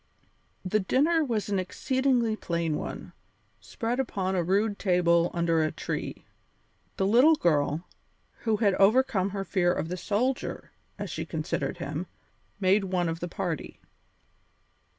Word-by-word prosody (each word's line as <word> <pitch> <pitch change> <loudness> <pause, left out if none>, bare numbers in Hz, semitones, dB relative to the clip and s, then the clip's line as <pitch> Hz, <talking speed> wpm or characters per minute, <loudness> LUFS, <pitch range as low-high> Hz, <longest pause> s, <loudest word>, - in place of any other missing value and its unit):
The 215 +4 +1
dinner 300 - +2
was 230 -7 -1
an 200 -2 +1
exceedingly 250 +3 0
plain 170 -6 -2
one, - - -6 0.5
spread 240 0 -3
upon 195 -7 -1
a 180 - +2
rude 200 +4 +1
table 175 -2 +3
under 170 -1 +1
a 155 -1 +1
tree. - - -5 0.7
The 190 - +1
little 250 +10 +6
girl, 155 - +1 0.5
who 220 -2 0
had 205 -3 +3
overcome 200 -2 +4
her 195 0 -4
fear 175 -1 +2
of 165 -2 -2
"the 180 - -3
soldier" 225 +8 -2 0.3
as - - -5
she - - -3
considered - - -3
him, - - -4 0.5
made 195 +1 +3
one 180 -2 0
of 165 0 -3
the 175 - -4
party. 170 -3 -4
195 Hz, 140 wpm, -28 LUFS, 175-225 Hz, 0.7 s, little